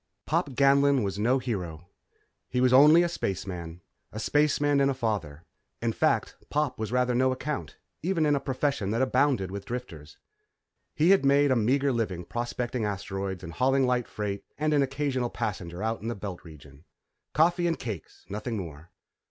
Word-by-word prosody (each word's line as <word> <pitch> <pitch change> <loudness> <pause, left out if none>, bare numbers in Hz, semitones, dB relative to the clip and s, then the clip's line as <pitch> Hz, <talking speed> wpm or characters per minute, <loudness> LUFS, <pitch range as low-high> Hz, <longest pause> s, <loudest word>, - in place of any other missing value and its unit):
_ - - -63
Pop 140 - 0
Ganlon 140 -1 +4
was 100 0 -3
no 120 +5 +3
hero 90 -10 -4 0.6
he 125 - -1
was 125 0 +4
only 150 +6 +8
a - - +2
spaceman. 90 - -4 0.3
A 110 - -6
spaceman 145 +3 +2
and 135 - +3
a 135 - -1
father. 100 - -3 0.4
In - - -1
fact, - - +1
Pop 150 -5 -1
was 110 -1 -3
rather 125 0 +2
no 130 +2 +3
account, 140 +3 -4 0.2
even 170 -2 +1
in 145 -1 +3
a - - +1
profession 135 -6 -1
that 115 +5 +1
abounded 130 -7 +1
with 100 0 -5
drifters. 100 -12 -7 0.8
He 160 +5 +4
had 195 - +5
made 140 0 +4
a - - +4
meagre 135 +5 +2
living 95 -7 -2
prospecting 120 +1 -3
asteroids 95 -2 -3
and 85 -1 -7
hauling 135 +5 +2
light 125 -1 0
freight 100 -2 -4
and 155 +1 +1
an 145 - +4
occasional 135 -2 -1
passenger 90 -4 -4
out 110 +1 -2
in 110 - -5
the 120 - -2
Belt 95 -3 -7
Region. 75 -3 -14 0.5
Coffee 175 +3 +3
and 165 - 0
cakes, 110 -8 -7
nothing 110 +3 -4
more. 80 -3 -8
120 Hz, 175 wpm, -27 LUFS, 100-140 Hz, 0.8 s, only